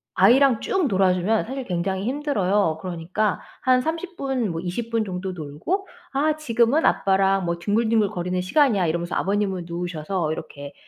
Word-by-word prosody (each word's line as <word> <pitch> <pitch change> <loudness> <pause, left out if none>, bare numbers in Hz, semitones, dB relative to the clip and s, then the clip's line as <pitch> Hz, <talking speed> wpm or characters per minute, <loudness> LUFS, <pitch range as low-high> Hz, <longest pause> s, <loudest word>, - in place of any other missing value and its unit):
아이랑 245 +5 +5
쭉 385 -5 0
놀아주면 190 0 +2
사실 265 +2 -5
굉장히 190 +1 -2
힘들어요. 210 - +1
그러니까 185 +4 -2 0.2
한 255 -1 +3
30 330 +5 -4
분 260 -7 -1
뭐 165 - -4
20 185 +6 -4
분 225 -1 +1
정도 185 -1 -4
놀고 175 - -4 0.3
"아 300 +3 +2
지금은 250 +1 +2
아빠랑 195 -1 +2
뭐 170 0 -2
뒹굴뒹굴 215 +2 +2
거리는 180 +1 -2
시간이야." 205 - +3
이러면서 170 +2 -2
아버님은 195 -3 -1
누우셔서 170 -1 -3
이렇게 145 -3 -8
195 Hz, 350 characters per minute, -23 LUFS, 180-250 Hz, 0.3 s, 아이랑